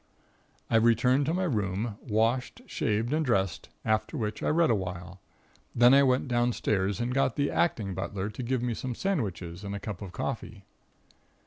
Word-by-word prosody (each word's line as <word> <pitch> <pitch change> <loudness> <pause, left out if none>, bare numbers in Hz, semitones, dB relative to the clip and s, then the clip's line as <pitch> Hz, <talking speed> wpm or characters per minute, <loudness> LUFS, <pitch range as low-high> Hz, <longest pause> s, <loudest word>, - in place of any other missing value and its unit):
"I 115 - +3
returned 120 +4 +3
to 160 - +1
my 185 - 0
room, 105 - -1
washed, 120 - 0
shaved 115 - -1
and 160 +1 +1
dressed, 95 - 0 0.2
after 110 +8 0
which 110 -3 -3
I - - 0
read 165 -1 +3
awhile. 90 -2 -4 0.5
Then 120 +2 +7
I 140 - +7
went 130 0 +2
downstairs 110 -5 0
and 120 +1 -1
got 135 -2 +1
the 145 0 0
acting 105 - 0
butler 95 +2 -3
to 110 - -7
give 125 0 -1
me 120 -1 0
some 125 +2 -4
sandwiches 100 - -3
and 100 0 -4
a - - -4
cup 105 -2 -6
of 100 -3 -7
coffee. 110 -4 -5
115 Hz, 175 wpm, -28 LUFS, 100-130 Hz, 0.5 s, Then